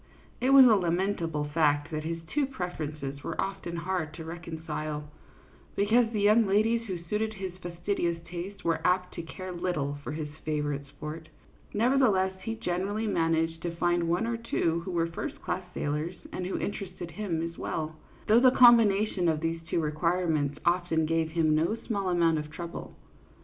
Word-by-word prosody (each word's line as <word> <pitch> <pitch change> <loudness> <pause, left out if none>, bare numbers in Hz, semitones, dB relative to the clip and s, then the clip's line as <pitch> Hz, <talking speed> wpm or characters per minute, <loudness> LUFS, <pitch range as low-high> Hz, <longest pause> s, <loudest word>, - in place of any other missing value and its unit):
It 255 - +2
was 275 -1 +9
a 235 - +7
lamentable 175 -4 0
fact 145 -1 +1
that 155 -1 -3
his 165 0 -3
two 280 - 0
preferences 155 - -5
were - - -5
often 195 -3 -3
hard 170 -2 -2
to 160 - -7
reconcile, 160 -2 -5 0.7
because 225 +3 +3
the 215 -3 -1
young 215 +2 +5
ladies 225 +4 +2
who 185 -3 -2
suited 215 +5 -2
his 190 -2 -5
fastidious 175 0 -1
taste 180 +4 -7
were 165 -1 +1
apt 180 0 +1
to - - -4
care 185 +3 -7
little 170 -6 -2
for 150 - -4
his 155 -1 -3 0.2
favorite 145 -2 -2
sport; 155 +3 -8 0.4
nevertheless, 215 -5 +3
he 225 +4 -3
generally 200 +3 -2
man 165 -6 +2
aged 165 0 -1
to 170 -1 -3
find 175 0 +1
one 175 +6 +1
or 230 0 -1
two 170 -7 0
who - - -4
were 170 -1 +1
first 165 0 -5
class - - -1
sailors 150 +4 -2 0.2
and 180 - -3
who 190 - -2
interested 180 -4 -5
him 170 -3 -2
as 165 0 -5
well, 155 -1 -3 0.3
though 220 +2 +6
the 255 +1 +7
combi 240 -3 +8
nation 195 -3 +1
of 155 -1 +1
these 165 +1 -2
two - - +1
requirements 155 -2 0
often 170 -2 +2
gave 165 0 +1
him 160 -1 +2
no 165 +8 +2
small 200 -4 -1
amount 165 -3 +3
of 150 0 -6
trouble. 170 +1 -7
170 Hz, 175 wpm, -29 LUFS, 160-195 Hz, 0.7 s, was